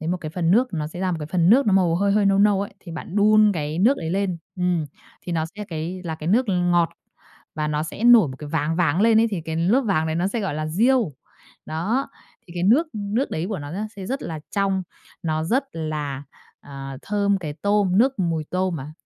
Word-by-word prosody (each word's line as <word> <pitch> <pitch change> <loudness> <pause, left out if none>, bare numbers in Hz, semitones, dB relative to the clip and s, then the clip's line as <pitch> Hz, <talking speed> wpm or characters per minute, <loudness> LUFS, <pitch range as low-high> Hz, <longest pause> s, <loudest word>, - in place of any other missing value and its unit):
lấy 160 - -4
một 180 - 0
cái 155 -4 -7
phần 170 -1 0
nước, 245 +6 +3
nó 155 -3 -2
sẽ 170 +3 -8
ra 185 -1 0
một - - -1
cái 150 - -4
phần 170 +2 +2
nước 255 +2 +5
nó 205 - +3
màu 180 -3 +3
hơi 200 +1 +2
hơi 205 -1 +3
nâu 195 0 +3
nâu 200 -1 +4
ấy, 200 0 -5
thì 170 - -10
bạn 170 +4 -7
đun 215 0 +5
cái 155 0 -3
nước 245 +9 +4
ấy 160 -1 -4
lên. 190 -2 -1 0.2
Ừm, 180 -3 0 0.4
thì 175 - -5
nó 160 -1 0
sẽ 210 0 -6
cái 170 +3 -4
là 160 -2 -3
cái 155 0 -8
nước 230 +8 +3
ngọt 175 -2 +2 0.6
và 155 -1 -2
nó 150 0 -1
sẽ 165 +8 -5
nổi 235 - +7
một 130 - -8
cái 150 - -8
váng 160 +1 -1
váng 170 0 +2
lên 225 0 +5
ấy, 230 - +4
thì 190 - -2
cái 160 0 -4
lớp 190 +11 +3
váng 195 -10 0
đấy 160 - -1
nó 175 +2 0
sẽ 230 +3 -2
gọi 195 -7 -2
là 155 +1 -3
riêu. 225 - +2 0.5
Đó, 195 +13 -1 0.4
thì 170 - -12
cái 175 - -3
nước 250 - +4
nước 210 +5 -2
đấy 160 +3 -2
của 205 -5 -3
nó 145 +2 -7
da 210 +4 -3
sẽ 190 -2 -7
rất 270 +6 -3
là 160 -2 -5
trong, 195 -1 0 0.4
nó 155 -1 -1
rất 260 +10 +1
là, 150 -4 -4 0.4
à, 135 -1 -8
thơm 200 -1 +1
cái 155 -5 -5
tôm, 200 +2 +1
nước 265 +4 +3
mùi 165 -4 -1
tôm 185 -1 -1
mà, 145 +1 -7
180 Hz, 250 wpm, -23 LUFS, 160-205 Hz, 0.6 s, nổi